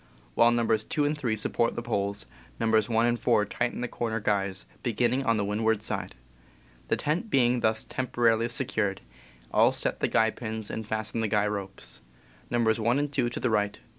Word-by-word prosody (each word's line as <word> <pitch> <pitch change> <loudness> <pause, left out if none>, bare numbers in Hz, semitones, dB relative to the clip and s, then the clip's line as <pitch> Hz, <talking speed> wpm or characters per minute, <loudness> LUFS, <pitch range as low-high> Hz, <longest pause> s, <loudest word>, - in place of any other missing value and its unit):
While 115 - +5
Nos. 115 -2 +2
2 150 +5 0
and 150 +1 +1
3 125 -7 -1
support 115 +2 0
the 120 - -4
poles, 100 -3 -2 0.3
Nos. 110 -1 +2
1 115 0 +3
and 120 0 +1
4 105 - +3
tighten 120 +4 -2
the 125 - -1
corner 115 -2 -2
guys, 100 -3 -1 0.2
beginning 120 +3 +1
on 115 -3 +2
the 100 - 0
windward 105 +1 0
side. - - -4 0.7
The - - +2
tent 165 +9 -1
being 125 -6 +3
thus 110 -1 +2
temporarily 120 -3 +1
secured, 110 -6 -1 0.5
all - - +5
set - - -2
the - - +1
guy 110 0 +3
pins 110 -2 -5
and 110 -1 -5
fasten 110 +1 -2
the 110 - +1
guy 105 0 +2
ropes, 100 -2 -4 0.5
Nos. 115 -2 +2
1 115 +4 +2
and 145 0 -1
2 125 -4 +1
to 120 - -5
the 125 - 0
right, 105 -1 +1
Nos. - - -25
110 Hz, 195 wpm, -28 LUFS, 105-120 Hz, 0.7 s, While